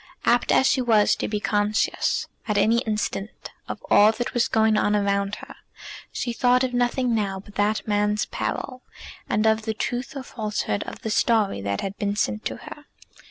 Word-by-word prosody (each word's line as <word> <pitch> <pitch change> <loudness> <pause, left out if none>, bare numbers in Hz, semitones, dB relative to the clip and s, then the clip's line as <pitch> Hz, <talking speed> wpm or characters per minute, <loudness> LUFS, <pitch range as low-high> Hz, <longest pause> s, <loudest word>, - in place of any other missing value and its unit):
Apt 240 0 +3
as - - +4
she 265 -1 +3
was 220 -4 +4
to - - -2
be 210 -1 -2
conscious 210 +1 0 0.2
at 210 -2 0
an 215 +2 +4
instant 215 -3 -1 0.4
of - - -7
all 210 +1 +7
that 240 +2 -4
was 240 - +2
going 220 -1 +3
on 210 0 +2
around 200 0 0
her, - - -11 0.6
she 240 - -3
thought 250 +2 +3
of 255 -1 -1
nothing 245 0 +1
now 200 -3 -1
but 200 +1 -14
that 210 +2 0
man's 210 0 +1
peril, 255 -1 -4 0.5
and 215 +1 +1
of 220 0 +3
the 220 0 -3
truth 245 +5 -3
or 270 - -5
falsehood 215 -5 -3
of - - -9
the 220 - -2
story 210 - +2
that 100 0 -2
had 195 0 -4
been 205 0 -1
sent 105 - -1
to - - -2
her. - - -10
215 Hz, 190 wpm, -24 LUFS, 205-240 Hz, 0.6 s, all